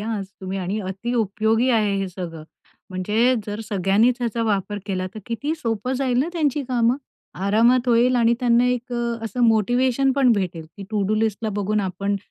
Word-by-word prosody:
हा 225 Hz, +2 st, -3 dB
आज 195 Hz, -, -5 dB
तुम्ही 190 Hz, 0 st, -4 dB
आणि 190 Hz, +3 st, -2 dB
अति 195 Hz, +5 st, -4 dB
उपयोगी 220 Hz, +2 st, +1 dB
आहे 210 Hz, -4 st, +2 dB
हे 195 Hz, -1 st, -2 dB
सगळं. 170 Hz, -3 st, -7 dB, 0.5 s
म्हणजे 210 Hz, +7 st, +2 dB
जर 210 Hz, +1 st, -4 dB
सगळ्यांनीच 210 Hz, +3 st, +2 dB
ह्याचा 235 Hz, -1 st, -1 dB
वापर 205 Hz, -1 st, -1 dB
केला 185 Hz, -2 st, -2 dB
तर -, -, -6 dB
किती 285 Hz, +7 st, -2 dB
सोपं 230 Hz, -5 st, -2 dB
जाईल 255 Hz, -2 st, 0 dB
ना 280 Hz, +6 st, +1 dB
त्यांची 295 Hz, -4 st, 0 dB
कामं 240 Hz, -1 st, +2 dB, 0.5 s
आरामात 235 Hz, +5 st, +3 dB
होईल 245 Hz, +2 st, +4 dB
आणि 235 Hz, -1 st, +4 dB
त्यांना 240 Hz, -1 st, +4 dB
एक 250 Hz, 0 st, -2 dB
अ, 235 Hz, -1 st, -1 dB
असं 225 Hz, +3 st, -4 dB
मोटिव्हेशन 245 Hz, +4 st, +2 dB
पण 265 Hz, -3 st, +4 dB
भेटेल, 180 Hz, -6 st, -2 dB
की 200 Hz, -, -8 dB
टू-डू 210 Hz, -1 st, 0 dB
लिस्टला 220 Hz, 0 st, 0 dB
बघून 210 Hz, +1 st, 0 dB
आपण 200 Hz, +1 st, -2 dB
225 Hz, 180 wpm, -22 LUFS, 200-245 Hz, 0.5 s, होईल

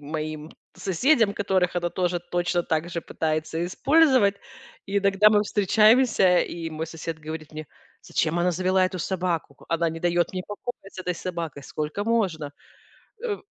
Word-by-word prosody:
моим 155 Hz, +1 st, -5 dB, 0.2 s
соседям, 220 Hz, -, +2 dB
которых 190 Hz, -3 st, 0 dB
она 175 Hz, 0 st, 0 dB
тоже 180 Hz, 0 st, -1 dB
точно 175 Hz, 0 st, -1 dB
так 160 Hz, +1 st, -1 dB
же 170 Hz, -, -3 dB
пытается 160 Hz, +1 st, -2 dB
использовать. 260 Hz, -, +3 dB, 0.5 s
И 200 Hz, 0 st, +1 dB
иногда 200 Hz, +1 st, +4 dB
мы 210 Hz, -1 st, +4 dB
встречаемся, 210 Hz, -1 st, +4 dB
и 165 Hz, -1 st, -4 dB
мой 160 Hz, +1 st, -4 dB
сосед 165 Hz, 0 st, -6 dB
говорит 155 Hz, 0 st, -7 dB
мне: 155 Hz, 0 st, -7 dB, 0.4 s
"Зачем 165 Hz, +1 st, -1 dB
она 175 Hz, +1 st, +2 dB
завела 185 Hz, +2 st, +2 dB
эту 185 Hz, 0 st, -2 dB
собаку? 175 Hz, -5 st, -2 dB
Ку -, -, -19 dB
Она 165 Hz, 0 st, +1 dB
не 165 Hz, 0 st, -6 dB
даёт 175 Hz, 0 st, +1 dB
мне 185 Hz, -1 st, -3 dB
покоя 225 Hz, +4 st, -6 dB, 0.2 s
с -, -, -14 dB
этой 180 Hz, -1 st, -2 dB
собакой. 170 Hz, -5 st, -5 dB
Сколько 155 Hz, +9 st, -4 dB
можно?" 185 Hz, -11 st, 0 dB, 0.7 s
Э, 445 Hz, -4 st, -2 dB
175 Hz, 160 wpm, -25 LUFS, 160-200 Hz, 0.7 s, иногда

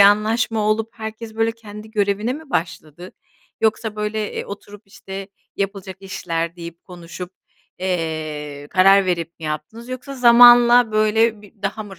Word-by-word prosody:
anlaşma 215 Hz, +2 st, +4 dB
olup 220 Hz, +1 st, 0 dB
herkes, 220 Hz, 0 st, -7 dB
böyle, 225 Hz, 0 st, +1 dB
kendi 215 Hz, -1 st, -11 dB
görevine 210 Hz, +2 st, 0 dB
mi 305 Hz, 0 st, -9 dB
başladı, 170 Hz, -, -4 dB, 0.5 s
yoksa, 220 Hz, -1 st, 0 dB
böyle, 210 Hz, 0 st, -3 dB
eee, -, -, -4 dB
oturup, 205 Hz, +1 st, -10 dB
işte, 195 Hz, 0 st, -9 dB, 0.3 s
yapılacak 195 Hz, -2 st, -4 dB
işler 170 Hz, -3 st, -4 dB
deyip, 170 Hz, 0 st, -9 dB
konuşup, 175 Hz, 0 st, -9 dB, 0.5 s
eee, 155 Hz, -5 st, -3 dB
karar 195 Hz, +1 st, +5 dB
verip 170 Hz, -1 st, -3 dB
mi -, -, -8 dB
yaptınız, 155 Hz, +11 st, -6 dB
yoksa 255 Hz, +2 st, -7 dB
zamanla 240 Hz, -1 st, +7 dB
böyle 215 Hz, 0 st, +2 dB
bi 205 Hz, -, -17 dB
daha 215 Hz, -, -2 dB
mı 195 Hz, -4 st, -12 dB
205 Hz, 140 wpm, -20 LUFS, 180-220 Hz, 0.5 s, zamanla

